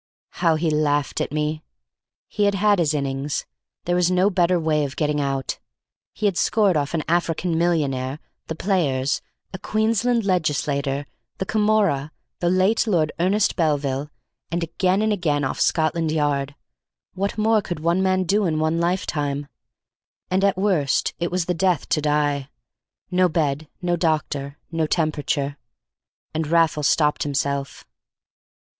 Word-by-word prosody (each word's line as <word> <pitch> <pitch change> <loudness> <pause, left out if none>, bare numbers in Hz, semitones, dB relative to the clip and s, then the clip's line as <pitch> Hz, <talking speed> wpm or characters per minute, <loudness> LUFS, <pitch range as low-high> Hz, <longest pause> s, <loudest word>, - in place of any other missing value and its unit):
How 165 -2 +4
he 160 0 0
laughed 145 -2 0
at - - -2
me! 150 +1 -1 0.7
He 205 - 0
had 200 0 +2
had 205 0 +3
his 155 -3 +1
innings; 140 0 -2 0.4
there 175 - +1
was 180 -1 +3
no 185 +3 +3
better 180 -1 +2
way 155 -2 +1
of 135 -2 -4
getting 150 -1 0
out. 135 -1 -2 0.5
He 215 - -4
had 195 -4 +1
scored 205 -5 +3
off 145 +2 -1
an 155 - -1
African 170 0 0
millionaire, 145 -6 0 0.3
the 160 - -4
Players, 150 -8 0 0.3
a 190 - -5
Queensland 225 +2 +1
Legislator, 145 -5 0 0.3
the 190 - -2
Camorra, 205 -9 +1 0.3
the 175 - +1
late 185 +6 +2
Lord 165 -7 +2
Ernest 195 +4 +2
Belville, 145 -4 0 0.4
and 170 +1 -1
again 185 +4 +1
and 220 -1 +2
again 150 -7 0
off 135 - -2
Scotland 160 0 +1
Yard. 145 -2 0 0.6
What 200 +3 -2
more 215 0 +3
could 175 -5 -5
one 170 +4 +1
man 185 0 +2
do 200 +2 +1
in 155 -2 0
one 155 +1 +1
lifetime? 150 -5 -1 0.9
And 190 +1 +2
at 200 -1 +3
the 185 - -4
worst 170 -9 +1
it 170 0 -1
was 180 -1 -1
the 180 - 0
death 180 -1 +1
to 155 - +1
die: 145 -2 0 0.6
no 180 0 +3
bed, 155 -2 -1 0.2
no 175 0 +1
doctor, 150 -4 -1
no 165 -2 0
temperature—and 145 - -4
Raffles 160 -2 +2
stopped 150 -2 +2
himself. 140 -2 -2
160 Hz, 150 wpm, -23 LUFS, 145-185 Hz, 0.9 s, How